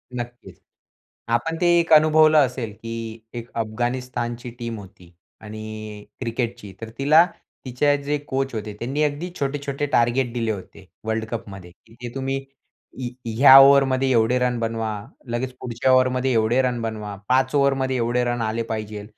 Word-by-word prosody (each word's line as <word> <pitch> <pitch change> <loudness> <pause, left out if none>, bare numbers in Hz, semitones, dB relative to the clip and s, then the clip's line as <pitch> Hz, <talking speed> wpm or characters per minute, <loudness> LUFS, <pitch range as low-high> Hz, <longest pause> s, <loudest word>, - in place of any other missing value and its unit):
नक्कीच. 120 -7 -8 0.7
आपण 165 +8 0
ते - - +3
एक 165 -1 -1
अनुभवलं 155 0 +6
असेल, 125 -3 -5
की 115 0 -7 0.2
एक 120 0 -7
अफगाणिस्तानची 120 +1 -3
टीम 115 -1 -4
होती 95 -3 -15 0.3
आणि 110 -1 -8
क्रिकेटची. 115 -4 -4
तर 115 - -6
तिला 155 +5 +6 0.4
तिचे 145 +3 +2
जे 145 +1 0
कोच 135 0 -2
होते, 105 -1 -5
त्यांनी 135 +6 -1
अगदी 150 +4 -2
छोटे-छोटे 140 0 -2
टार्गेट 120 +1 +2
दिले, 115 -2 -1
होते 95 -2 -9 0.2
वर्ल्ड 110 0 -1
कपमध्ये. 95 -6 -7 0.2
तिथे 120 +1 -9
तुम्ही 135 0 -2 0.6
य - - -2 0.3
या 135 0 +10
ओव्हरमध्ये 135 -1 +5
एवढे 115 +1 +3
रन 125 -1 0
बनवा, 115 -1 -2 0.4
लगेच 125 +1 -2
पुढच्या 125 +2 0
ओव्हरमध्ये 130 0 +3
एवढे 115 +3 +3
रन 125 -2 -1
बनवा, 105 -2 -5
5 130 +2 +2
ओव्हरमध्ये 135 -2 +2
एवढे 120 +1 0
रन 120 -1 -1
आले 115 +1 -1
पाहिजे 110 -2 -5
120 Hz, 145 wpm, -23 LUFS, 110-135 Hz, 0.7 s, या